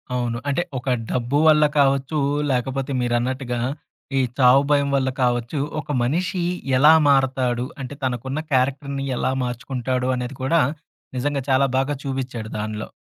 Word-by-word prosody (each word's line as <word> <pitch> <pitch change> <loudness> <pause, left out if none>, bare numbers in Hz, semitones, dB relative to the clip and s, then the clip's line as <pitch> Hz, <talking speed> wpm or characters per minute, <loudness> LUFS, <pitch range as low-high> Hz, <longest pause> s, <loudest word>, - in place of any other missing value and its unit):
అవును. 120 -1 -1
అంటే 140 +5 +1 0.2
ఒక 130 - -4 0.2
డబ్బు 125 +3 0
వల్ల 150 -1 +6 0.2
కావచ్చు. 140 +2 +2 0.3
లేకపోతే 130 +2 -1
మీరన్నట్టుగా, 120 +1 -1 0.6
ఈ - - +4 0.2
చావు 130 +1 +6
భయం 140 -1 +3
వల్ల 130 -1 +1
కావచ్చు. 120 +3 0 0.2
ఒక - - -7
మనిషి 180 +7 -1 0.3
ఎలా 150 +4 +7 0.2
మారతాడు? 130 -3 +2 0.2
అంటే, 130 +2 -6
తనకున్న 130 +3 -2
క్యారెక్టర్‌ని 135 +1 0
ఎలా 130 - 0
మార్చుకుంటాడు 125 +1 -2
అనేది 125 +1 -5
కూడా, 165 +5 +3 0.6
నిజంగా 140 +2 -1
చాలా 135 +1 +4
బాగా 135 +2 +1
చూపిచ్చాడు 130 -5 -4
దానిలో. 110 0 -4
130 Hz, 135 wpm, -22 LUFS, 125-140 Hz, 0.6 s, ఎలా